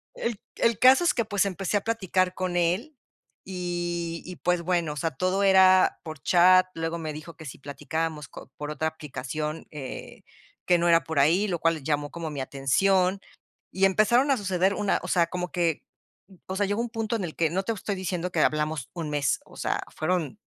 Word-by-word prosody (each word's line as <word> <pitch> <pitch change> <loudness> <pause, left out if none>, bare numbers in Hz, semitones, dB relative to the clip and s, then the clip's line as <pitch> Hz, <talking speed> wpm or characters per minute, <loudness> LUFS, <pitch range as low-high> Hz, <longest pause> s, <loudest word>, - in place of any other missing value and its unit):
El 235 - -2
c - - -28 0.2
el 230 -2 +3
caso 260 +7 +7
es 335 - +3
que, 235 - 0
pues, 205 -2 +1
empecé 195 +1 -1
a 200 - -2
platicar 190 -5 0
con 185 -1 -2
él, 180 - 0 0.5
y 175 -2 -3
y, 180 - -7
pues, 180 -1 0
bueno, 170 -3 0
o - - -10
sea, 165 +3 -1
todo 185 +8 0
era 190 -1 +5
por 155 -3 -8
chat, 185 +2 +5
luego 165 +1 -3
me 160 -2 -5
dijo 155 +2 -9
que 160 - -12
si 130 - -9
platicábamos 155 +1 -4
co - - -12
por 150 0 -5
otra 155 +1 -1
aplicación, 150 +1 -5
eh, 140 -4 -8 0.4
que 180 - +4
no 170 0 +1
era 165 0 +5
por 160 -3 -2
ahí, 170 +9 +3
lo 175 -4 -2
cual 165 -3 +1
llamó 145 0 -1
como 165 -2 -5
mi 145 -2 -5
atención. 180 +9 +1 0.5
Y 190 +1 +2
empezaron 235 +8 +3
a 265 - +3
suceder, 190 -1 +1
una 205 -2 0
o - - -5
sea, 170 -2 +2
como 180 +1 -4
que, 170 -4 0 0.6
o 190 - -4
sea, 205 +1 +1
llegó 205 +3 -1
un 240 - -3
punto 225 0 -2
en 210 - -2
el 160 - -5
que 165 -2 +1
no 190 +4 -1
te 230 - -2
estoy 200 0 -4
diciendo 180 -1 -3
que 160 - +1
hablamos 150 -3 0
un 165 -3 -4
mes, 145 -4 0
o - - -17
sea, - - -1
fueron 175 +3 -1
175 Hz, 210 wpm, -26 LUFS, 155-195 Hz, 0.6 s, caso